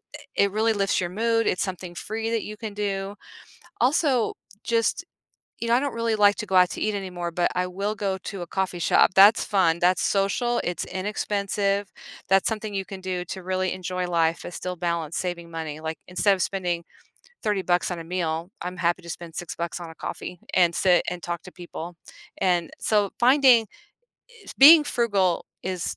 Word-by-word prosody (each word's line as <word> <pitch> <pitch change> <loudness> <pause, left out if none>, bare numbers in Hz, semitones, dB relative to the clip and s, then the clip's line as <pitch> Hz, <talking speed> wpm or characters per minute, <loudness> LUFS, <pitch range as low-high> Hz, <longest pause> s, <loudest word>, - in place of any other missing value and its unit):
eh, - - 0
it 200 - -2
really 220 +2 +2
lifts 200 -2 +1
your 175 - -2
mood, 230 +3 +1
it's 180 - +1
something 180 -2 -6
free 220 +4 -4
that 230 -2 -1
you 215 0 -7
can 220 -2 -6
do. 200 -1 -3 0.7
Also, 260 -1 +2 0.3
just 230 -1 0 0.6
you 230 - -2
know, 235 - +4
I - - +2
don't 280 -1 -2
really 230 -1 0
like 205 -1 +5
to 215 - -4
go 190 - 0
out 180 -1 +6
to - - -6
eat 215 - 0
anymore, 180 -3 -4
but 175 +1 +1
I 180 0 0
will 200 +4 -3
go 195 -2 -2
to 195 -4 -5
a - - -5
coffee 185 0 -2
shop- 170 - +4
that's 205 +4 +7
fun, 180 -5 +2
that's 180 +1 +2
social, 225 +5 +1
it's 175 - -2
inexpensive. 200 0 -1 0.4
That's 195 0 +4
something 215 -2 -4
you 195 - -2
can 190 0 -9
do 185 -1 -3
to 190 +1 -6
really 185 0 -1
enjoy 180 -1 -3
life 165 -1 +1
and - - -7
still 180 +1 -4
balance 170 -2 -2
saving 175 -2 -4
money- 160 -2 -5
like, 160 0 -4
instead 195 +3 +3
of 185 - -2
spending 175 -3 -2 0.6
30 210 -3 0
bucks 175 -1 +1
on 175 -2 -4
a - - -7
meal, 170 0 -2
I'm 180 +1 -5
happy 175 +1 0
to 170 - -12
spend 170 0 -7
6 175 - -5
bucks 170 +1 -4
on 170 -1 -8
a 160 - -12
coffee, 180 +2 -6
and 175 -2 +4
sit 180 -2 +4
and 180 -1 -6
talk 175 -1 -4
to 185 - -11
people- 175 -1 -8 0.4
and 175 -3 +1
so, 205 -2 +2
finding 255 -2 +6 0.7
eh, 435 - -18
being 300 +3 +10
frugal 200 -10 +1 0.2
is 185 -2 -3
190 Hz, 200 wpm, -25 LUFS, 175-210 Hz, 0.7 s, being